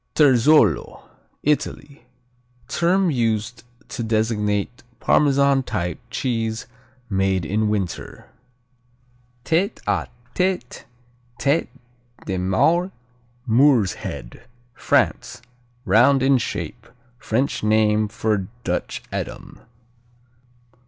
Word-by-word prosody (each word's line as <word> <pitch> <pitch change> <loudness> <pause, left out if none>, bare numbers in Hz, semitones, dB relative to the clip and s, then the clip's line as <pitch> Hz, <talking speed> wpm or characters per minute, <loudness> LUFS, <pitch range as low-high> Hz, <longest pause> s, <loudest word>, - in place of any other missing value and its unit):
Terzolo 145 +1 +4 0.4
Italy 145 -2 -2 0.6
Term 180 +1 +2
used 115 -2 -1 0.3
to - - -5
designate 110 +1 -1 0.2
Parmesan 140 -1 +3
type 90 -8 -3
cheese 115 -3 -2 0.4
made 95 -3 0
in 105 +5 0
winter. 100 -5 -4 1.2
Tête 185 +7 +1
à - - 0 0.3
Tête, 180 -9 -2 0.5
Tête 140 +7 +1 0.6
de 95 -1 -2
Maure, 160 - +2 0.6
Moor's 120 - +4
Head 105 - -8 0.3
France 120 0 0 0.4
Round 130 +4 +4
in 135 -1 +4
shape. 115 -1 -5 0.3
French 125 +5 -1
name 110 0 +3
for 105 -3 -1 0.2
Dutch - - -3
Edam. - - -6
115 Hz, 85 wpm, -22 LUFS, 105-140 Hz, 1.2 s, Terzolo